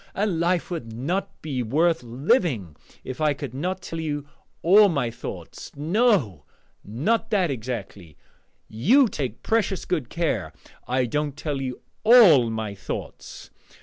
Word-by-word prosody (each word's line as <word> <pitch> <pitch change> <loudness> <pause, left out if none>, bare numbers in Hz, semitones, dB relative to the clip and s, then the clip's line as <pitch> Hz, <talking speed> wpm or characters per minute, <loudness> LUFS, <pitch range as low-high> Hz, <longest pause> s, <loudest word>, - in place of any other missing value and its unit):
And 195 -4 0
life 175 +1 0
would 120 -10 -5
not 175 - -2
be 140 -5 -2
worth 160 +9 +1
living 125 - 0 0.3
if 130 +4 -7
I 150 -2 +2
could 135 -3 -7
not 180 +7 -3
tell 165 - -5
you 145 -2 -3 0.4
all 200 +4 +7
my 135 -8 -1
thoughts 115 - -8
no, 155 - +1 0.4
not 210 - -1
that 190 -8 +1
exactly: 110 - -6 0.5
you 235 - +4
take 130 - -5
precious 215 -4 0
good 150 -9 -2
care 110 - -2 0.3
I 130 0 +1
don't 145 +3 -2
tell 145 -3 -3
you 130 -2 -5 0.2
all 200 - +7
my 110 -2 -3
thoughts! 100 - -8
150 Hz, 140 wpm, -24 LUFS, 120-185 Hz, 0.5 s, all